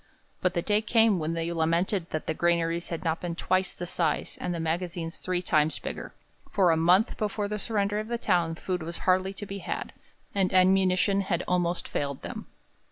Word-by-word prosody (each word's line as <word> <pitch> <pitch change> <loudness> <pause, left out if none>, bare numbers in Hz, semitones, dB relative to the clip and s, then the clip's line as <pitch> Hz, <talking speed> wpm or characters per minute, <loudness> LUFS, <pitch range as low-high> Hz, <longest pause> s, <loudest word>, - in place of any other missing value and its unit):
But 185 -1 +1
the 170 - 0
day 210 0 +2
came 220 -3 +4
when 160 +1 -1
they 165 +1 -2
lamented 170 +3 0
that 155 - -3
the - - -1
granaries 170 0 +1
had 165 +1 -4
not 165 -1 -1
been 175 -2 -3
twice 185 +1 0
the 175 - -5
size, 170 -2 -1
and 180 - -2
the 170 - -2
magazines 165 0 -2
three 180 -1 -1
times 155 -2 +2
bigger, - - -6 0.4
for 185 -4 +4
a - - +4
month 180 +7 +3
before 210 -1 -1
the 210 +1 -3
surrender 205 -1 0
of 215 - -4
the 235 +1 -1
town 175 -7 +1
food 180 +1 -3
was 170 +2 -5
hardly 185 +1 +2
to 205 - -6
be 195 0 -6
had, - - -4 0.4
and 190 -1 +1
ammunition 190 +1 +4
had 180 -3 -1
almost 175 -1 0
failed 140 -2 -3
them. - - -6
180 Hz, 200 wpm, -28 LUFS, 165-195 Hz, 0.4 s, came